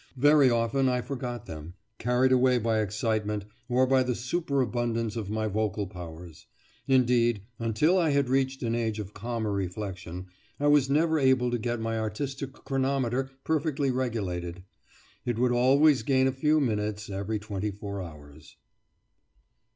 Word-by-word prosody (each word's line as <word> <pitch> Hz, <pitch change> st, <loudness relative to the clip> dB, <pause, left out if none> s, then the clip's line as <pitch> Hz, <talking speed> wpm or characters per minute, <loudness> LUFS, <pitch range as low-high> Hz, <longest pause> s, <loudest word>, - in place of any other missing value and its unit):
Very 145 Hz, 0 st, +6 dB
often 120 Hz, +3 st, +2 dB
I 125 Hz, -1 st, +1 dB
forgot 125 Hz, -3 st, -5 dB
them, 80 Hz, +2 st, -8 dB, 0.2 s
carried 125 Hz, +2 st, +2 dB
away 130 Hz, 0 st, +4 dB
by 115 Hz, -1 st, +1 dB
excitement, 105 Hz, 0 st, -1 dB, 0.2 s
or 125 Hz, +1 st, +3 dB
by 130 Hz, 0 st, +3 dB
the 125 Hz, -1 st, 0 dB
superabundance 120 Hz, -5 st, -1 dB
of 110 Hz, -4 st, -4 dB
my 110 Hz, +1 st, -1 dB
vocal 105 Hz, -1 st, -1 dB
powers; 85 Hz, -3 st, -10 dB, 0.4 s
indeed, 120 Hz, -5 st, +3 dB, 0.2 s
until 115 Hz, -, +2 dB
I 165 Hz, -3 st, +2 dB
had 140 Hz, -2 st, +2 dB
reached 135 Hz, 0 st, 0 dB
an 115 Hz, -1 st, 0 dB
age 115 Hz, -2 st, -1 dB
of 105 Hz, -1 st, -6 dB
calmer 115 Hz, 0 st, -3 dB
reflection 95 Hz, -2 st, -4 dB, 0.3 s
I 145 Hz, +1 st, +3 dB
was 145 Hz, -2 st, +4 dB
never 160 Hz, +2 st, +3 dB
able 130 Hz, -2 st, +3 dB
to 120 Hz, -, 0 dB
get 120 Hz, +1 st, -2 dB
my 115 Hz, 0 st, -2 dB
artistic 135 Hz, +6 st, -4 dB
chronometer 135 Hz, -2 st, -1 dB
perfectly 150 Hz, -3 st, 0 dB
regulated; 95 Hz, -9 st, -3 dB, 0.6 s
it 120 Hz, -2 st, -2 dB
would 125 Hz, +1 st, +2 dB
always 135 Hz, +3 st, +4 dB
gain 130 Hz, +3 st, +2 dB
a 130 Hz, -, +3 dB
few 150 Hz, +4 st, +2 dB
minutes 105 Hz, -5 st, -1 dB
every 100 Hz, +2 st, -3 dB
twenty 105 Hz, -1 st, -4 dB
four 100 Hz, -1 st, -6 dB
hours. 75 Hz, -3 st, -12 dB
120 Hz, 150 wpm, -28 LUFS, 105-130 Hz, 0.6 s, Very